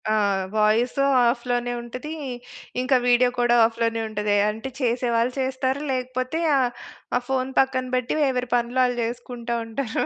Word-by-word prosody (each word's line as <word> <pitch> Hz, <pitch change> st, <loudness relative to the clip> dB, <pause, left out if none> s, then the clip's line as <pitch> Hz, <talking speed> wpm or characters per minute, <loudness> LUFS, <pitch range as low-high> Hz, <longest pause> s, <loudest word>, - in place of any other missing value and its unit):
ఆ! -, -, +2 dB, 0.4 s
వాయిస్ 215 Hz, +3 st, +2 dB, 0.4 s
ఆఫ్‌లోనే 245 Hz, -1 st, -2 dB
ఉంటది. 255 Hz, +6 st, -7 dB, 0.7 s
ఇంక 255 Hz, +2 st, 0 dB
వీడియో 245 Hz, 0 st, +5 dB
కూడా 240 Hz, 0 st, +4 dB
ఆఫ్‌లోనే 230 Hz, 0 st, -1 dB
ఉంటది. 210 Hz, -1 st, 0 dB
అంటే 220 Hz, +5 st, -5 dB
చేసేవాళ్ళు 240 Hz, 0 st, +1 dB
చేస్తారు 260 Hz, +1 st, -1 dB
లేకపోతే 255 Hz, +3 st, -2 dB, 0.2 s
ఆ! -, -, +3 dB, 0.6 s
ఆ -, -, 0 dB
ఫోన్ 265 Hz, -1 st, 0 dB
పక్కన 260 Hz, -1 st, +2 dB
పెట్టి 250 Hz, +2 st, -1 dB
ఎవరి 250 Hz, -1 st, -1 dB
పనులు 240 Hz, +1 st, 0 dB
ఆళ్ళు 245 Hz, -1 st, 0 dB
జేసుకుంటా 235 Hz, 0 st, -4 dB
ఉంటారు. 225 Hz, +1 st, -2 dB
245 Hz, 135 wpm, -24 LUFS, 235-255 Hz, 0.7 s, వీడియో